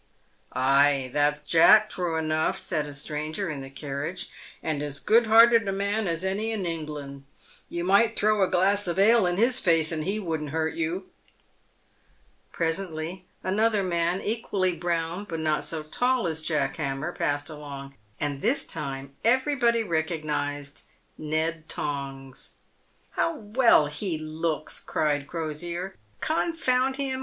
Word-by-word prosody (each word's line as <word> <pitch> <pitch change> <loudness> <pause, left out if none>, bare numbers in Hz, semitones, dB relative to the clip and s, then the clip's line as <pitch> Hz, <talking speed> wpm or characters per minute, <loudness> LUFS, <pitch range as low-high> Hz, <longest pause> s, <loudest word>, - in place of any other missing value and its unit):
"Ay, 135 0 +3
that's 150 0 +1
Jack, 205 +8 +6
true 175 -5 -2
enough," 160 +3 0
said 155 -4 -2
a 145 - -8
stranger 155 +5 -3
in 140 -3 -5
the 135 - -8
carriage, 140 +5 -5
" - - -20
and 155 -2 -1
as 145 -1 -4
good 225 +2 +4
hearted 230 0 +6
a - - +1
man 200 +2 -1
as 165 0 -1
any 200 +4 -1
in 210 -4 -2
England. 150 -4 -5 0.5
You 170 0 -3
might 205 +5 +4
throw 215 0 +2
a 190 - +4
glass 195 +2 +2
of 170 0 -1
ale 215 0 +5
in 175 0 -1
his 240 +4 +3
face, 165 -3 +3
and 155 -1 -2
he 195 +6 -1
wouldn't 160 -6 -3
hurt 160 +1 -1
you." 170 +4 -3 1.4
Presently 170 +1 -3 0.2
another 210 +2 +2
man, 175 0 0
equally 200 -4 0
brown 170 +2 -2
but 165 -2 -3
not 155 -1 0
so 160 -2 -3
tall 245 +10 0
as 160 -2 0
Jack 150 -4 -1
Hammer, 140 +2 -2
passed 145 0 -1
along, 140 -3 -8 0.3
and 145 -2 -2
this 245 +6 +1
time 135 -2 -5
everybody 240 -1 +3
recognised 155 -5 -2 0.3
Ned 160 +1 -2
Tongs. 135 -2 -5 0.3
" - - -38
How 335 - +1
well 225 - +4
he 155 +4 -3
looks," 155 0 -3
cried 145 -2 -1
Crosier. 170 +3 -4 0.2
" 105 - -36
Confound 270 -5 +1
him 265 -1 -2
165 Hz, 150 wpm, -26 LUFS, 150-200 Hz, 1.4 s, Jack